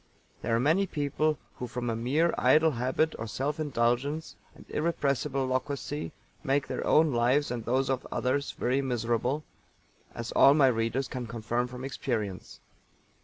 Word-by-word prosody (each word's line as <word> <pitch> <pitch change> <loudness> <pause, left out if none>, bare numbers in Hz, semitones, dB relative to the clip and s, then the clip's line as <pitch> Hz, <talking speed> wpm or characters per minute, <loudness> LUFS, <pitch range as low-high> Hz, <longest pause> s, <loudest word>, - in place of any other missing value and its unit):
There 115 - 0
are - - +2
many 160 +10 +3
people 150 0 0 0.2
who 125 - -4
from 120 0 -4
a 115 - 0
mere 145 +9 +1
idle 160 +1 +4
habit 130 +5 0
or 115 - -4
self 140 +7 -2
indulgence 140 +2 0 0.2
and - - -15
irrepressible 140 -4 0
loquacity 140 +3 -3 0.3
make 140 -1 +1
their - - -3
own 155 -2 +4
lives 125 +4 +2
and 120 -2 -4
those 130 +3 +1
of 135 -1 -2
others 135 +3 -1
very 130 +3 0
miserable 125 +2 -1 0.7
as 115 0 -5
all 140 +1 +6
my 140 -3 +6
readers 115 +2 0
can 125 -2 -5
confirm 120 +2 -2
from 125 +1 -7
experience. 110 -8 -4
130 Hz, 155 wpm, -29 LUFS, 120-145 Hz, 0.7 s, all